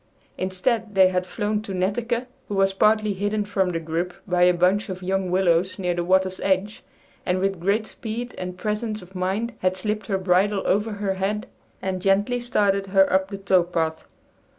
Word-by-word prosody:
Instead 205 Hz, +3 st, -1 dB
they 190 Hz, -1 st, +6 dB
had 180 Hz, 0 st, -1 dB
flown 210 Hz, +1 st, -1 dB
to 200 Hz, -3 st, -6 dB
Netteke, 230 Hz, +6 st, -1 dB, 0.2 s
who 205 Hz, -, -3 dB
was 195 Hz, 0 st, +3 dB
partly 215 Hz, +1 st, +3 dB
hidden 205 Hz, +2 st, -1 dB
from 195 Hz, -2 st, 0 dB
the 170 Hz, -2 st, -2 dB
group 165 Hz, +2 st, -3 dB
by 180 Hz, -1 st, +1 dB
a 180 Hz, 0 st, +7 dB
bunch 180 Hz, +4 st, +2 dB
of 185 Hz, 0 st, -6 dB
young 190 Hz, 0 st, -1 dB
willows 185 Hz, 0 st, +2 dB
near 180 Hz, -3 st, 0 dB
the 175 Hz, 0 st, -2 dB
water's 185 Hz, +1 st, +2 dB
edge, 195 Hz, +2 st, 0 dB, 0.4 s
and 180 Hz, -, 0 dB
with 195 Hz, -1 st, -1 dB
great 200 Hz, +5 st, +1 dB
speed 235 Hz, +3 st, -6 dB
and 180 Hz, 0 st, -5 dB
presence 215 Hz, 0 st, -3 dB
of 180 Hz, +1 st, -16 dB
mind 195 Hz, +6 st, -2 dB
had 185 Hz, 0 st, 0 dB
slipped 210 Hz, +1 st, -3 dB
her 195 Hz, -, 0 dB
bridle 190 Hz, +2 st, +2 dB
over 210 Hz, +2 st, +1 dB
her 200 Hz, -1 st, -1 dB
head 200 Hz, +3 st, -2 dB, 0.4 s
and 185 Hz, -1 st, -2 dB
gently 205 Hz, +6 st, +2 dB
started 205 Hz, -5 st, +1 dB
her 195 Hz, -1 st, +4 dB
up 190 Hz, 0 st, +3 dB
the 200 Hz, -, -5 dB
tow 195 Hz, -2 st, +3 dB
path. 165 Hz, -2 st, -2 dB
195 Hz, 190 wpm, -24 LUFS, 185-210 Hz, 0.4 s, a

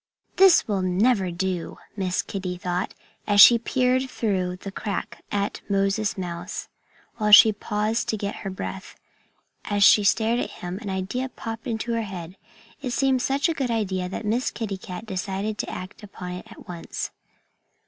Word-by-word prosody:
"This 380 Hz, -2 st, +6 dB
will 200 Hz, -3 st, 0 dB
never 190 Hz, +2 st, +2 dB
do," 180 Hz, 0 st, -3 dB, 0.2 s
Miss 185 Hz, -3 st, -1 dB
Kitty 185 Hz, -2 st, -4 dB
thought, 180 Hz, +1 st, -3 dB, 0.3 s
as 205 Hz, -1 st, +3 dB
she 235 Hz, +4 st, +10 dB
peered 255 Hz, +2 st, +1 dB
through 185 Hz, -7 st, -1 dB
the 195 Hz, +2 st, -8 dB
crack 200 Hz, 0 st, -5 dB
at 200 Hz, 0 st, -2 dB
Moses 200 Hz, +2 st, +1 dB
Mouse, 175 Hz, -2 st, -5 dB, 0.5 s
while 210 Hz, -2 st, +1 dB
she 215 Hz, +1 st, +10 dB
paused 210 Hz, +2 st, -1 dB
to 220 Hz, -, 0 dB
get 200 Hz, 0 st, -4 dB
her 195 Hz, -, -5 dB
breath. 190 Hz, 0 st, -6 dB, 0.7 s
And 205 Hz, -, -2 dB
as 200 Hz, -, +4 dB
she 210 Hz, -, +7 dB
stared 225 Hz, +3 st, +2 dB
at -, -, -2 dB
him, 180 Hz, +2 st, -6 dB
an 215 Hz, -3 st, -6 dB
idea 195 Hz, +8 st, -2 dB
popped 225 Hz, +1 st, -7 dB
into 235 Hz, 0 st, -2 dB
her 230 Hz, -, 0 dB
head. 185 Hz, -4 st, -7 dB, 0.5 s
It 255 Hz, -3 st, -3 dB
seemed 265 Hz, -1 st, +2 dB
such 275 Hz, +4 st, +1 dB
a 330 Hz, -, 0 dB
good 270 Hz, -5 st, -2 dB
idea 190 Hz, -5 st, -1 dB
that 200 Hz, -, -5 dB
Miss 235 Hz, +5 st, +1 dB
Kitty 210 Hz, -4 st, -4 dB
Cat 180 Hz, +3 st, -7 dB
decided 200 Hz, +1 st, -3 dB
to -, -, -2 dB
act 185 Hz, +4 st, -7 dB
upon 185 Hz, -3 st, -8 dB
it 180 Hz, 0 st, -7 dB
at -, -, -13 dB
once. 170 Hz, -2 st, -5 dB
205 Hz, 175 wpm, -25 LUFS, 185-230 Hz, 0.7 s, she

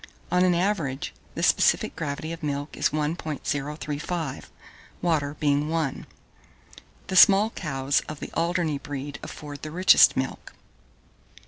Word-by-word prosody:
On 180 Hz, +1 st, +3 dB
an 180 Hz, -1 st, +3 dB
average, 170 Hz, -8 st, -1 dB, 0.2 s
the -, -, -3 dB
specific -, -, +3 dB
gravity 150 Hz, +2 st, -4 dB
of 165 Hz, +1 st, -7 dB
milk 145 Hz, -1 st, -3 dB
is -, -, +1 dB
1.035, 150 Hz, 0 st, -3 dB, 0.5 s
water 150 Hz, -4 st, 0 dB
being 145 Hz, 0 st, +1 dB
1. 160 Hz, -4 st, -2 dB, 1.0 s
The 185 Hz, -, -4 dB
small 200 Hz, +4 st, +7 dB
cows 140 Hz, -6 st, -1 dB
of 155 Hz, -1 st, -7 dB
the -, -, -8 dB
Alderney 170 Hz, -3 st, 0 dB
breed 145 Hz, 0 st, -6 dB
afford 145 Hz, -1 st, -8 dB
the 155 Hz, -, -6 dB
richest 180 Hz, -1 st, +6 dB
milk. 130 Hz, 0 st, -4 dB
150 Hz, 125 wpm, -25 LUFS, 145-170 Hz, 1.0 s, small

